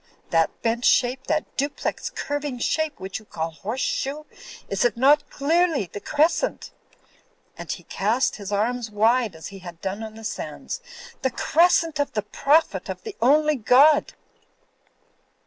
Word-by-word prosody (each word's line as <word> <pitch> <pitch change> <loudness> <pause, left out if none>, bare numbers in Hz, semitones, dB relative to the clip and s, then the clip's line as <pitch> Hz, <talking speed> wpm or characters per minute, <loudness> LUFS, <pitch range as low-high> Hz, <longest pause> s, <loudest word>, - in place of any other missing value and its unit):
That 165 -1 +1
bent 235 +1 0
shape, 255 +2 +2
that 310 0 +1
duplex 285 +1 -2
curving 290 -2 -4
shape, 315 +5 -1
which 190 +2 -5
you 215 - -18
call 165 -4 -4
horse 215 +10 -5
shoe, 290 +3 -2 0.4
is 195 - 0
it 240 -1 +1
not 285 +4 +4
clearly 310 - +1
the - - -4
Crescent?" 315 - 0 0.8
and - - -6
he - - -5
cast 230 +7 0
his 200 -1 -7
arms 225 +3 -1
wide 220 -1 +2
as 160 - -8
he 195 -1 -10
had 175 -2 -10
done 195 +4 -4
on 220 -1 -7
the 225 - -11
sands, - - -5 0.4
"the 265 - +1
Crescent 330 +3 +2
of 285 -1 0
the 210 - -1
Prophet 285 +9 +1
of - - -6
the 435 -3 -7
only 300 +4 +4
God?'' 270 +6 +5
250 Hz, 155 wpm, -24 LUFS, 210-295 Hz, 0.8 s, God